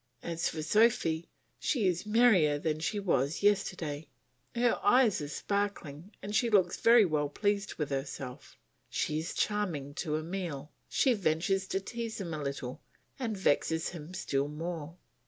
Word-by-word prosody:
As 170 0 -1
for 155 -1 -4
Sophy 170 -4 +2 0.3
she 240 -8 0
is 180 +2 0
merrier 210 -10 +5
than 155 +1 -1
she 205 +6 -1
was 155 -4 0
yesterday; 170 -7 0 0.5
her 240 0 +2
eyes 225 -4 +4
are 145 - -4
sparkling 200 -2 -3
and 205 +2 -4
she 235 +3 +3
looks 190 -5 +2
very 230 -2 +7
well 150 -4 0
pleased 205 +5 -1
with 150 -3 -3
herself; 135 -2 -5 0.3
she 155 0 -1
is 160 - -5
charming 175 -10 -1
to 155 -1 -2
Emile; 155 -4 -5 0.2
she 260 - +3
ventures 190 0 0
to 195 - -1
tease 230 +2 -5
him 175 -4 -4
a 155 - -4
little 140 -3 -5 0.4
and 225 -5 -2
vexes 160 -2 +1
him 170 +1 -9
still 140 -5 -1
more. 165 +1 -5
175 Hz, 155 wpm, -31 LUFS, 150-205 Hz, 0.5 s, very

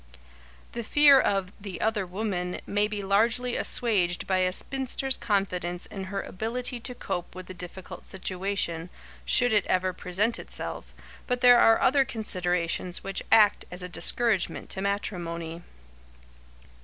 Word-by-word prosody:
The 235 - -5
fear 285 +3 +6
of 195 -3 -1
"the 195 -4 -7
other 215 -4 -1
woman" 180 -2 -3
may 205 +1 0
be 210 -1 -5
largely 230 +5 +1
assuaged 185 -7 +1
by 190 -1 0
a 185 0 +1
spinster's 265 +4 0
confidence 180 -4 -2
in 195 -1 -7
her 195 +1 -4
ability 240 +5 -3
to 250 +1 -4
cope 175 -7 -5
with 185 0 -8
the 185 - -9
difficult 180 0 -9
situation, 185 -3 -3 0.4
should 245 -2 +5
it 205 -2 +3
ever 185 0 0
present 195 +6 -1
itself, - - -6 0.4
but 250 -1 -1
there 245 -1 +7
are 225 - +5
other 270 +1 +3
considerations 180 -6 -2
which 195 0 -3
act 215 -2 +5
as 180 0 -9
a - - -5
discouragement 215 +1 +3
to 190 - -4
matrimony. 170 -4 -4
195 Hz, 145 wpm, -26 LUFS, 180-225 Hz, 0.4 s, there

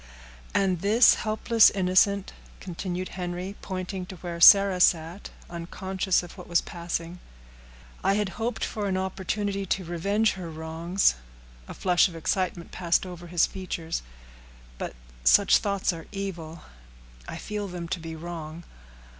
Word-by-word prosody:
"And 185 -3 +2
this 220 +5 +6
helpless 220 +1 +4
innocent," 195 +1 +2 0.3
continued 185 0 -5
Henry, 180 +2 -5
pointing 185 -1 -5
to 190 - -8
where 170 -1 -7
Sarah 195 0 +8
sat, 170 +3 +2 0.2
unconscious 185 +2 -1
of 175 - -11
what - - -10
was 170 0 +3
passing, 170 0 -5 0.8
"I 195 +1 +3
had 205 -2 0
hoped 230 +4 -3
for 210 -2 -3
an 190 -1 0
opportunity 195 +1 -2
to 185 0 -1
revenge 200 +6 +1
her 180 -3 -7
wrongs;" 160 +4 0 0.5
a - - -8
flush 180 0 +3
of 175 - -10
excitement 175 +1 -2
passed 170 0 +1
over 175 -1 -9
his 170 -1 +3
features; 170 -3 -4 0.8
"but - - -5 0.3
such - - +6
thoughts 200 -3 0
are 165 -1 -9
evil—I 60 - -9
feel 210 -1 -4
them 175 -2 -6
to 180 - -2
be 165 0 -7
wrong. 165 0 -7
180 Hz, 140 wpm, -26 LUFS, 170-195 Hz, 0.8 s, Sarah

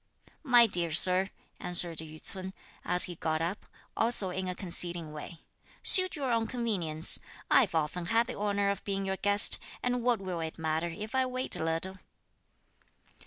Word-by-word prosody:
"My 245 -5 +5
dear 175 -6 0
Sir," 185 +3 +5 0.3
answered 175 -2 +1
Yü 155 0 -10
ts'un, 190 +2 -7 0.3
as 180 0 +1
he 180 - +3
got 155 -1 -2
up, 170 +5 -5 0.3
also 225 -5 -2
in 190 +1 -5
a 180 - -4
conceding 175 -3 0
way, 155 +2 -10 0.4
"suit 370 -1 +8
your 275 -4 -3
own 230 -1 -1
convenience. 180 -10 +1 0.3
I've 225 -11 +3
often 160 +3 -3
had 230 +5 +1
the 250 - -7
honour 200 -1 -2
of 200 - -7
being 195 -1 -4
your 190 0 -3
guest, 205 +1 +2 0.2
and 245 0 -2
what 240 -2 0
will 185 -3 -6
it 160 -1 -6
matter 160 +1 -3
if 210 +7 -9
I 260 0 0
wait 255 +1 +1
a - - -5
little?" 165 +4 -4
190 Hz, 170 wpm, -28 LUFS, 170-225 Hz, 0.4 s, suit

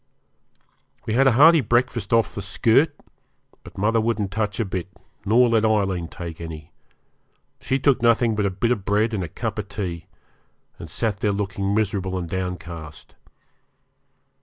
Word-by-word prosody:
We 110 - -2
had 135 +3 +4
a 130 - +5
hearty 160 +5 +7
breakfast 120 -4 0
off 115 -1 +2
the 100 - -5
'skirt', 115 - +2 0.7
but - - -14
mother 110 +3 +2
wouldn't 110 -3 -1
touch 105 0 -2
a 115 - +1
bit, 95 -2 -4 0.4
nor 120 +4 +5
let 115 -2 +2
Aileen 100 -6 +1
take 85 -1 -8
any; 80 -1 -8 0.9
she 130 - -1
took 135 -2 +2
nothing 115 -1 +3
but 105 -2 0
a - - 0
bit 100 +6 -1
of 110 -6 -1
bread 105 +3 +1
and 100 -4 -1
a - - -4
cup - - -4
of - - -6
tea, 85 -5 -5 0.7
and 80 - -9
sat 105 +3 -2
there 105 - +1
looking 100 0 -2
miserable 95 -3 -1
and 90 -2 -4
downcast. 85 -3 -6
105 Hz, 160 wpm, -23 LUFS, 95-115 Hz, 0.9 s, hearty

